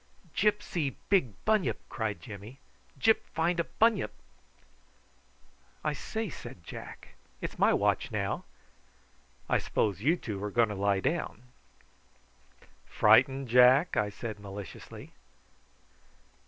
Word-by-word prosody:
"Gyp 210 -1 +2
see 150 -10 -2
big 180 - +3
bunyip!" 215 -3 +2
cried 110 -3 -3
Jimmy. 110 +3 -10 0.4
"Gyp 220 0 +4
find 170 +2 +1
a 170 - +1
bunyip!" 225 -3 +2 1.7
"I 150 - 0
say," 220 +9 -4
said 120 - -9
Jack; - - -9 0.3
"it's - - -6
my - - +5
watch - - +1
now. - - -2 1.0
I - - +2
s'pose 100 -3 -1
you 155 +9 +3
two 105 - -5
are 105 - -2
going 115 +1 +3
to - - -3
lie 100 -1 +1
down." 135 - -2 1.4
"Frightened, 135 0 +4
Jack?" 125 +7 +6
I 105 -1 +1
said 110 0 -6
maliciously. 100 -3 -9
125 Hz, 115 wpm, -30 LUFS, 105-170 Hz, 1.7 s, Jack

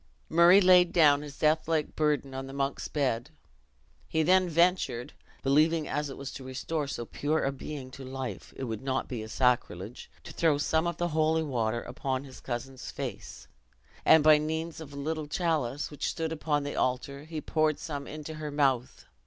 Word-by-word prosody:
Murray 170 +3 +7
laid 180 -2 +6
down 145 -4 +5
his 145 -1 -9
death 155 +1 +2
like 160 -2 0
burden 150 -3 0
on 135 0 -5
the 135 - -9
monk's 140 0 -2
bed. 130 -3 -1 0.8
He 160 0 +1
then 185 +2 +4
ventured 170 -8 +1 0.3
(believing, 155 +3 +3
as 150 -1 -2
it 135 - -8
was 140 -1 -6
to 135 - -8
restore 140 +4 -3
so 120 -4 -4
pure 155 +6 -1
a 135 - +1
being 135 -1 -7
to 135 +1 -9
life, 130 0 -6
it - - -5
could 115 -3 -4
not 135 0 -1
be 110 -4 -5
sacrilege) 120 -3 -1
to - - -10
throw 160 -4 +2
some 160 +3 +1
of 170 -1 -3
the 175 0 0
holy 160 0 +2
water 120 -5 -1
upon 130 +1 -3
his 130 -2 -12
cousin's 130 +1 -5
face; - - -7 0.6
and 160 - +6
by 155 -1 +7
means 160 +2 -3
of 150 -3 -9
a - - -10
little 155 +2 -3
chalice, 150 -5 -1
which 145 - -2
stood 160 -1 -3
upon 150 -2 0
the 145 - -4
altar, 140 +3 -1
he 160 -1 -5
poured 155 0 +1
some 145 -3 -5
into 155 +1 -7
her 155 -1 -5
mouth. 135 -4 0
145 Hz, 185 wpm, -29 LUFS, 135-160 Hz, 0.8 s, Murray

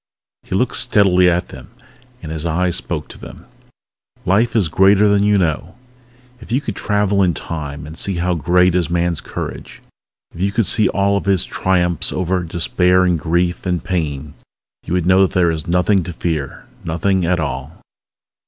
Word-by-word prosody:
He - - -5
looked 125 +6 +1
steadily 95 -6 +4
at 90 +1 -1
them - - -12 0.5
and 80 - -6
his 80 -1 -4
eyes 85 +1 0
spoke - - -4
to - - -11
them... - - -12 0.8
_Life 110 +6 +2
is 105 -7 +3
greater 95 +5 +4
than 100 0 +3
you 105 0 +3
know. 85 0 -1 0.6
If 115 - -12
you 125 - +2
could 115 -8 -5
travel 105 -1 0
in 90 -4 +2
Time, 75 -3 -6
and 80 +2 -9
see 95 +3 -2
how 90 +1 0
great 90 +3 +2
is 90 -2 0
man's 85 -1 0
courage - - -7 0.5
if 85 - -8
you 100 +1 +1
could 115 +1 +1
see 105 +4 +2
all 100 0 +1
of - - -4
his 95 -2 +2
triumphs 90 -3 0
over 90 0 -1
despair 90 +2 +1
and 90 -3 +1
grief 85 +3 -1
and 90 -3 -1
pain 75 -5 -3 0.5
you - - -3
would 90 -2 0
know 95 +1 +4
that 95 - +2
there 85 -2 +3
is 80 +1 -5
nothing 90 +3 +2
to 90 - -5
fear! 80 -5 -4 0.2
Nothing 90 +3 0
at 90 +1 +1
all! 70 0 -5
90 Hz, 180 wpm, -18 LUFS, 85-95 Hz, 0.8 s, steadily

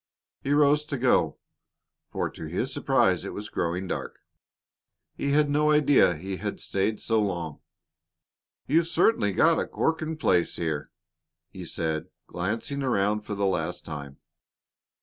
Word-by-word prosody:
He 140 - -2
rose 145 0 +4
to 145 -2 -3
go, 125 0 +2 0.7
for - - -2
to - - -8
his - - -2
surprise - - +2
it - - -5
was 105 +1 -6
growing 90 +2 -2
dark; - - -4 1.0
he 140 - -2
had 150 +1 +4
no 150 +1 +2
idea 145 - +5
he 95 +4 -5
had - - -4
stayed 105 +2 -1
so 115 -1 +1
long. 85 -7 -3 1.1
"You've 165 +3 +2
certainly 170 - +2
got 160 - +4
a - - -1
corking 160 0 -1
place 90 - +2
here," 80 -3 -2 0.6
he - - -8
said, 80 -2 -2 0.2
glancing 110 +10 -3
around 105 -5 +1
for 105 0 -5
the 100 0 0
last 90 -2 -1
time. 70 -3 -7
105 Hz, 145 wpm, -27 LUFS, 90-145 Hz, 1.1 s, idea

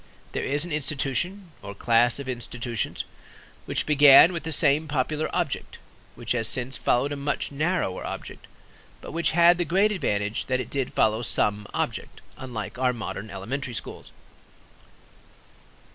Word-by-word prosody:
There - - -3
is 145 +3 0
an 175 - -8
institution, 155 +6 -2
or 100 0 -8
class 120 +3 +3
of 140 -2 -7
institutions, 120 -2 -3 0.6
which - - 0
began 145 +3 +8
with 170 - -3
the 160 - -5
same 150 +1 +3
popular 150 +2 -1
object, - - -3 0.4
which 120 -1 -6
has 115 -3 +1
since 130 +2 -1
followed 130 +4 +1
a - - -2
much 140 +1 -3
narrower 155 - -1
object, - - -7 0.5
but - - -8
which 170 +2 +1
had 170 +1 +6
the - - +2
great 190 +6 +2
advantage 105 - -1
that 130 -1 0
it - - -5
did 135 -3 -2
follow 110 +1 +2
some 105 -1 +1
object, - - -3 0.2
unlike 125 -2 -6
our 130 -1 +2
modern 110 -2 -6
elementary 120 +6 -4
schools. - - -7
135 Hz, 150 wpm, -25 LUFS, 115-155 Hz, 0.6 s, began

